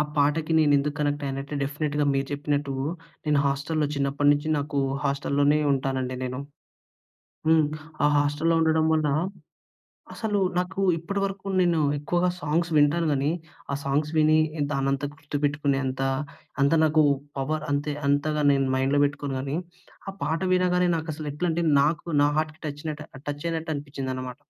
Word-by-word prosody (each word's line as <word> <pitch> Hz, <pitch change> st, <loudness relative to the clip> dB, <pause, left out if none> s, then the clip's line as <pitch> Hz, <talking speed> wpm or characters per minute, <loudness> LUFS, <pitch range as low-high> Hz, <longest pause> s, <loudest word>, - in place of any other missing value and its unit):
ఆ! -, -, +5 dB
పాటకి 150 Hz, +3 st, +2 dB
నేనెందుకు 145 Hz, -1 st, +3 dB
కనెక్ట్ 145 Hz, 0 st, 0 dB
అయ్యానంటే, 135 Hz, +2 st, -4 dB
డెఫినెట్‌గా 145 Hz, +1 st, -1 dB
మీరు 135 Hz, 0 st, 0 dB
చెప్పినట్టు 145 Hz, -1 st, -1 dB, 0.5 s
నేను 150 Hz, -1 st, +3 dB
హాస్టల్‌లో 145 Hz, +3 st, 0 dB
చిన్నప్పటినుంచి 145 Hz, +2 st, +2 dB
నాకు 145 Hz, 0 st, -2 dB, 0.3 s
హాస్టల్ 140 Hz, 0 st, -1 dB
లోనే 145 Hz, +1 st, +4 dB
ఉంటానండి 130 Hz, -1 st, -1 dB
నేను. 125 Hz, 0 st, -4 dB, 1.1 s
హ్మ్. 160 Hz, -1 st, +5 dB, 0.4 s
ఆ -, -, +6 dB
హాస్టల్‌లో 145 Hz, +3 st, +1 dB
ఉండడం 160 Hz, 0 st, +3 dB
వల్ల 155 Hz, -1 st, +2 dB, 1.1 s
అసలు 215 Hz, -3 st, -1 dB, 0.2 s
నాకు 180 Hz, +2 st, -1 dB, 0.2 s
ఇప్పటి 185 Hz, +5 st, -3 dB
వరకు 195 Hz, 0 st, -4 dB
నేను 175 Hz, -3 st, +3 dB, 0.2 s
ఎక్కువగా 175 Hz, +5 st, +1 dB
సాంగ్స్ 165 Hz, +2 st, 0 dB
వింటాను 150 Hz, +3 st, +3 dB
గానీ 140 Hz, +1 st, +1 dB, 0.4 s
ఆ -, -, -1 dB
సాంగ్స్ 145 Hz, +2 st, 0 dB
విని 155 Hz, 0 st, +5 dB, 0.3 s
దానంతా 135 Hz, 0 st, 0 dB
గుర్తుపెట్టుకునేంత 145 Hz, -3 st, -1 dB, 0.6 s
అంత 140 Hz, +1 st, +4 dB
నాకు 155 Hz, 0 st, +4 dB, 0.4 s
పవర్ 155 Hz, +3 st, -1 dB
అంతే 145 Hz, +1 st, 0 dB
అంతగా 150 Hz, +1 st, +1 dB
నేను 135 Hz, -1 st, +2 dB
మైండ్‌లో 135 Hz, +2 st, +2 dB
పెట్టుకోను 145 Hz, -1 st, -3 dB
గానీ, 135 Hz, +2 st, -3 dB, 0.5 s
ఆ -, -, -3 dB
పాట 160 Hz, +3 st, -1 dB
వినగానే 180 Hz, 0 st, +3 dB
నాకసలు 155 Hz, -2 st, -5 dB
ఎట్లంటే 170 Hz, +2 st, -1 dB, 0.2 s
నాకు 155 Hz, +3 st, 0 dB, 0.2 s
నా -, -, +5 dB
హార్ట్‌కి 155 Hz, 0 st, -2 dB
టచ్‌‌నట్టు 150 Hz, +1 st, -5 dB, 0.2 s
టచ్చయినట్టు 160 Hz, +2 st, -3 dB
అనిపిచ్చిందన్నమాట. 130 Hz, -3 st, -5 dB
145 Hz, 135 wpm, -26 LUFS, 140-160 Hz, 1.1 s, ఆ